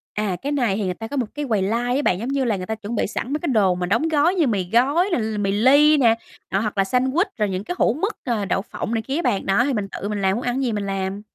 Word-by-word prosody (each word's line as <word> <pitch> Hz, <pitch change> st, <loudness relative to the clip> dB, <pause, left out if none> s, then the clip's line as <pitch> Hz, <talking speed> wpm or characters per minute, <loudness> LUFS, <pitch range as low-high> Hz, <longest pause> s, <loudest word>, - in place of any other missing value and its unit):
À, 210 Hz, -3 st, -1 dB
cái 285 Hz, -, -3 dB
này 245 Hz, -9 st, +1 dB
thì 210 Hz, -, -1 dB
người 180 Hz, -, -1 dB
ta 225 Hz, +5 st, -7 dB
có 285 Hz, -, -5 dB
một 250 Hz, -, +1 dB
cái 295 Hz, 0 st, -3 dB
quầy 215 Hz, -4 st, +1 dB
line 235 Hz, +6 st, 0 dB
á 285 Hz, -, +1 dB
bạn, 180 Hz, -, +2 dB
giống 235 Hz, +5 st, -4 dB
như 275 Hz, -2 st, 0 dB
là 225 Hz, -, +1 dB
người 185 Hz, -, -5 dB
ta 220 Hz, -, -3 dB
chuẩn 220 Hz, +2 st, -6 dB
bị -, -, 0 dB
sẵn 250 Hz, +5 st, -4 dB
mấy 300 Hz, -, 0 dB
cái 340 Hz, -, -4 dB
đồ 205 Hz, -8 st, +3 dB
mà 180 Hz, 0 st, -2 dB
đóng 230 Hz, -, +1 dB
gói 315 Hz, +4 st, +3 dB
như 330 Hz, -6 st, +2 dB
mì 195 Hz, -6 st, -1 dB
gói 285 Hz, -, +3 dB
nè, -, -, +2 dB
l 220 Hz, -1 st, -2 dB
mì 195 Hz, -1 st, 0 dB
ly 285 Hz, +8 st, +5 dB
nè, 230 Hz, -5 st, +4 dB, 0.4 s
đó, 195 Hz, -, +1 dB
hoặc 210 Hz, -1 st, -3 dB
là 195 Hz, -, +4 dB
sandwich, 260 Hz, -, +1 dB
rồi 210 Hz, -2 st, 0 dB
những 185 Hz, 0 st, -3 dB
cái 355 Hz, -, -4 dB
hũ 230 Hz, -, +3 dB
mức, 400 Hz, -, -3 dB
ờ, 225 Hz, -6 st, -1 dB
đậu 195 Hz, -, 0 dB
phộng 225 Hz, +2 st, -5 dB
này 225 Hz, -, 0 dB
kia 270 Hz, +5 st, -4 dB
á 340 Hz, -, 0 dB
bạn. 240 Hz, -, 0 dB
Đó, 195 Hz, +5 st, +3 dB
thì 280 Hz, -, 0 dB
mình 205 Hz, -3 st, -2 dB
tự 200 Hz, +1 st, -6 dB
mình 210 Hz, -1 st, -2 dB
làm, 190 Hz, 0 st, +2 dB
muốn 240 Hz, -, -3 dB
ăn 245 Hz, 0 st, -1 dB
cái 270 Hz, -, -1 dB
gì 250 Hz, -3 st, 0 dB
mình 205 Hz, -1 st, -2 dB
làm. 195 Hz, 0 st, -3 dB
225 Hz, 335 wpm, -22 LUFS, 200-270 Hz, 0.4 s, ly